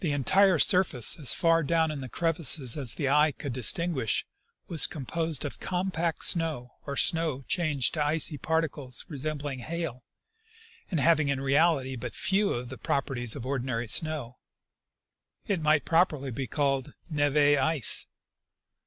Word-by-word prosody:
127 145 -4 -1 0.2
entire 190 -4 +4
surface, 155 - +5
and - - -13
as 140 - +4
far 165 0 +2
down 160 +1 0
in 145 -2 -6
the 130 - -8
crevasses 160 -5 +2
as 130 -7 -2
the 140 - -2
eye 150 +2 +3
could 140 -1 -7
distinguish, 130 - +1 0.4
was 165 -3 +4
composed 160 0 -3
of 145 - -7
compact 180 -3 -2
snow, 155 -8 +1 0.2
or 140 -1 -4
snow 160 -5 0
changed 155 -7 +1
to 155 - -1
icy 150 +1 0
particles 145 -4 -3
resembling 145 -2 -5
hail 155 -2 -5 0.9
and 170 - -1
having 155 -1 +3
in 140 -1 -1
reality 135 -1 +1
but 120 -1 -7
few 200 +1 +1
of 120 0 -4
the 130 - -10
properties 130 -4 -1
of 130 -4 -7
ordinary 125 -3 -3
snow: 140 -1 0 1.1
it 190 -5 -2
might 155 -1 +2
properly 155 -5 +1
be 130 +2 -5
called 135 -2 -2
neve 145 -3 -1 0.2
ice. 150 -3 +1
145 Hz, 150 wpm, -27 LUFS, 130-165 Hz, 1.1 s, surface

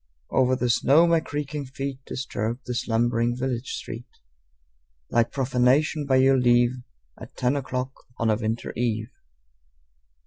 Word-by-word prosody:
Over 130 -1 +3
the 125 -1 +1
snow 145 +7 +5
my 170 -1 +4
creaking 150 -1 -4
feet 135 0 -5
Disturbed 120 -2 -3
the 125 - -3
slumbering 120 0 0
village 130 -1 -3
street 115 +2 -7 1.0
Like 115 -1 +2
profanation, 135 +3 +2
by 135 - +3
your 135 0 +5
leave, 120 0 +4 0.5
At - - -12
ten 125 +2 +1
o'clock 130 -1 -3 0.2
of 115 - 0
a - - +3
winter 110 +1 -3
eve. 110 -1 -1
125 Hz, 135 wpm, -25 LUFS, 120-135 Hz, 1.0 s, snow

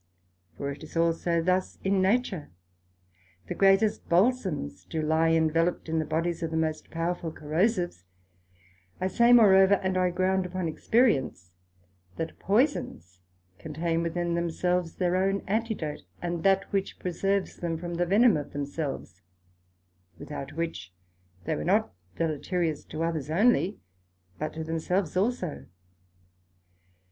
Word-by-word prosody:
For 140 0 -3
it 140 - -9
is 155 - -8
also 165 0 +1
thus 185 +1 0
in 195 0 +2
nature. 195 -5 0 1.0
The - - -4
greatest 195 +2 +3
Balsomes 175 - +1
do 160 - -2
lie 160 +1 +2
enveloped 165 +2 +1
in 160 0 0
the 155 - -1
bodies 165 +3 -1
of 165 -1 -2
most 160 -1 -1
powerful 165 0 -2
Corrosives; 175 - -1 1.0
I 185 - -1
say 235 +6 +4
moreover, 200 -4 +7
and 190 -1 -1
I 180 0 +3
ground 185 +1 0
upon 180 -1 -3
experience, 155 - +1 0.6
that 165 0 -5
poisons 195 - 0 0.4
contain 165 +2 -2
within 170 +1 -1
themselves 170 0 -1
their 180 -1 0
own 195 +1 +1
Antidote, 215 -7 -2 0.2
and 175 -1 -3
that 195 +2 +2
which 195 -1 -1
preserves 195 +2 -1
them 165 -2 -2
from 175 +1 -5
the 175 +1 0
venome 210 0 +5
of - - -12
themselves, 140 - -5 1.0
without 145 - -7
which 145 - -5 0.5
they - - -1
were 75 - -4
not - - +1 0.2
deleterious 160 0 -1
to 155 +1 -4
others 160 -4 -2
onely, 205 +2 +3 0.6
but 155 0 -3
to 160 - -5
themselves 165 +2 -1
also. 190 -5 -1
170 Hz, 130 wpm, -27 LUFS, 160-190 Hz, 1.0 s, moreover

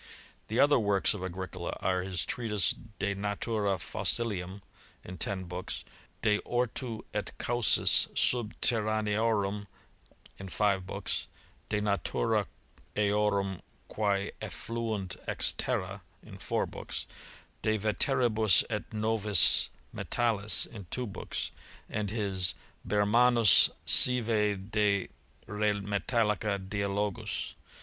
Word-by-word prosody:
The 110 +3 -1
other 145 -2 +5
works 100 -3 +2
of 100 -3 -6
Agricola 95 -1 -5
are 95 -1 0
his 90 -3 -2
treatise 105 -5 0 0.3
De 100 0 -1
Natura 105 0 -1
Fossilium, 95 +2 -1 0.4
in 90 -2 -9
ten 95 +1 -2
books; 90 +1 -5 0.4
De 105 -1 +3
Ortu 120 -1 -2
et 105 - -2
Causis 120 -2 +3
Subterraneorum, 110 -3 +1 0.7
in 95 0 -7
five 95 -2 +1
books; - - -2 0.4
De 105 - 0
Natura 100 -12 0 0.5
eorum 100 -2 +1 0.3
qu«e 100 -2 0
efiluunt 110 -5 -4
ex - - +1
Terra, 95 +1 -2 0.2
in - - -12
four - - -1
books; - - -6 0.6
De 110 0 +1
veteribus 110 -1 +3
et 105 -2 -3
novis 110 -4 +3 0.2
Metallis, 110 -3 +1
in 100 -6 -11
two 125 +5 -2
books; 100 - -4 0.4
and 105 -2 -3
his 95 -4 -1 0.3
Bermannus 110 +3 +5 0.2
sive 105 -5 +3
de 105 -3 +1 0.2
' - - -32
re 105 0 0
metallica 105 0 0
Dialogus. 100 0 -2
105 Hz, 105 wpm, -30 LUFS, 95-110 Hz, 0.7 s, other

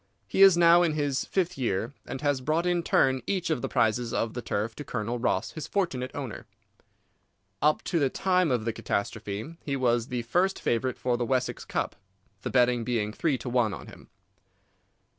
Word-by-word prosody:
He - - 0
is 195 -3 +8
now 170 0 +7
in 170 -3 +2
his 145 -3 -1
fifth 180 -3 -1
year, 115 +1 -1
and 135 +2 -5
has 145 -3 +1
brought 155 +6 0
in 175 -1 +2
turn 130 -5 +2
each 185 -4 -1
of 150 - 0
the - - -2
prizes 115 +1 +1
of 115 -1 -1
the 120 - -4
turf 105 0 -2
to 145 - -5
Colonel 120 -2 -3
Ross, 115 -4 0
his 155 - -6
fortunate 155 -11 -1
owner. 135 -6 -6 1.1
Up 150 +2 +3
to 170 - 0
the 140 -3 +2
time 185 +2 +1
of 120 -4 0
the 115 - -1
catastrophe 110 +7 -4
he 140 - -2
was 120 -3 +1
the 125 -1 -3
first 180 +11 +1
favourite 125 +2 0
for 125 -1 0
the 120 - -1
Wessex 130 0 -1
Cup, - - -2 0.5
the - - -3
betting 125 -2 +3
being 110 -3 -1
three 145 +1 0
to 120 - -9
one 120 -4 +1
on - - -10
him. - - -14
130 Hz, 195 wpm, -27 LUFS, 115-160 Hz, 1.1 s, is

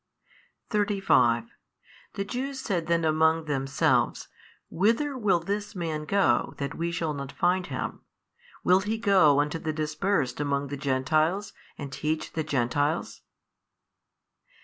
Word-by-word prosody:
35 195 - +3 0.7
The 200 - -2
Jews 265 +5 -4
said 185 -10 -2
then 170 -1 +1
among 160 +1 +2
themselves, 135 -2 0 0.4
Whither 230 - +1
will 205 -8 +2
this 205 +5 -4
man 160 -4 -3
go 155 -9 +2
that 140 -1 -3
WE 170 +1 -2
shall 165 -3 -2
not 140 -1 -6
find 180 +1 +1
Him? - - -5 0.6
will 185 +1 +5
He 210 +3 -2
go 190 -10 +4
unto 150 +3 0
the 160 - -2
dispersed 155 0 -1
among 140 -1 -1
the 145 - -3
Gentiles 155 +8 0 0.2
and 140 -2 -6
teach 155 +1 -2
the 160 - -1
Gentiles? 145 +3 -1
160 Hz, 125 wpm, -27 LUFS, 145-195 Hz, 0.7 s, will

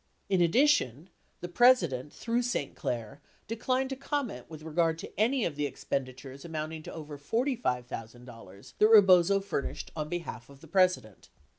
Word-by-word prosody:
In 190 -2 +2
addi 210 - +4
tion, 160 - 0 0.3
the 175 - -4
President 175 - +3
through 235 +1 -1
St. 240 - -2
Clair 120 +3 -5 0.3
declined 255 +4 -1
to - - -2
comment 270 - -4
with 155 -1 -10
regard 160 +1 0
to - - -9
any 240 +2 +2
of 155 - -3
the 145 0 -1
expenditures 135 0 -5
amounting 160 -1 -5
to - - -9
over 150 -2 -8
$45,000 125 - -4
that 215 - +6
Rebozo 195 -3 +6
furnished 195 -8 -4
on 155 -1 -4
behalf 165 -10 -6
of 140 0 -16
the 165 - -13
President. 180 - +1
160 Hz, 155 wpm, -29 LUFS, 135-215 Hz, 0.3 s, that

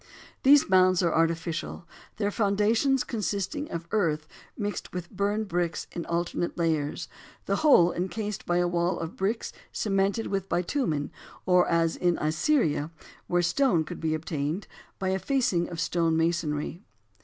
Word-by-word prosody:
These 280 +1 +6
mounds 185 -1 +4
are 170 - +2
artificial, 165 +1 -1 0.3
their 205 -1 0
foundations 220 +6 +2
consisting 220 +6 -3
of 170 0 -5
earth 155 -7 0 0.3
mixed 205 -2 -4
with 180 -1 -5
burned 205 +2 -1
bricks 175 -2 -1
in 170 - -5
alternate 170 0 -2
layers, 160 -4 -1 0.4
the - - 0
whole 225 - +5
encased 205 +3 -4
by 175 - +2
a 175 0 +2
wall 175 +1 0
of 165 +1 -5
bricks 210 +4 -2 0.2
cemented 195 +1 0
with 195 -1 -2
bitumen, 175 - -1 0.3
or 180 -1 +4
as 165 -1 +2
in 175 -1 +1
Assyria, 155 - +1 0.4
where 175 0 +2
stone 180 - +2
could 155 - -8
be 160 -1 0
obtained, 155 +3 -3 0.3
by 190 - -2
a 190 0 0
facing 215 -10 +1
of 170 -2 -6
stone 165 -1 +1
masonry. 165 0 -1
175 Hz, 145 wpm, -27 LUFS, 165-205 Hz, 0.4 s, These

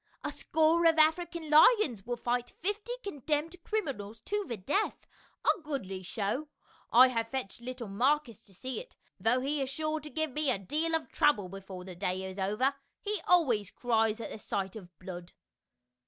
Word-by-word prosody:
"A - - -2
score 320 +2 +3
of 325 -1 +4
African 320 0 +2
lions 300 - +5
will 245 0 -2
fight 245 +1 -1
fifty 415 +5 -1
condemned 300 -1 -2
criminals 245 - -3
to 415 - -1
the 235 - -3
death, 295 - -1 0.4
a 400 - +3
goodly 245 -12 -4
show. 210 - -2 0.4
I 255 +2 +8
have 230 -2 -1
fetched 245 -3 -4
little 250 -1 -6
Marcus 240 +2 +1
to 195 - -15
see 255 +7 -4
it, - - -11 0.2
though 225 +6 +3
he 285 +2 -1
is 265 - -1
sure 310 +3 -1
to 300 0 -9
give 315 -1 -1
me 300 +1 0
a 250 - +3
deal 310 - -1
of 320 - -1
trouble 205 -11 +2
before 195 -1 -8
the 185 0 -8
day 185 +1 -1
is 190 +1 -6
over; 210 +8 +1 0.3
he 420 -3 -2
always 250 - +4
cries 225 -2 +1
at 220 -2 -6
sight 190 0 -2
of 190 -5 -9
blood." 180 -1 -8
255 Hz, 175 wpm, -31 LUFS, 205-315 Hz, 0.4 s, I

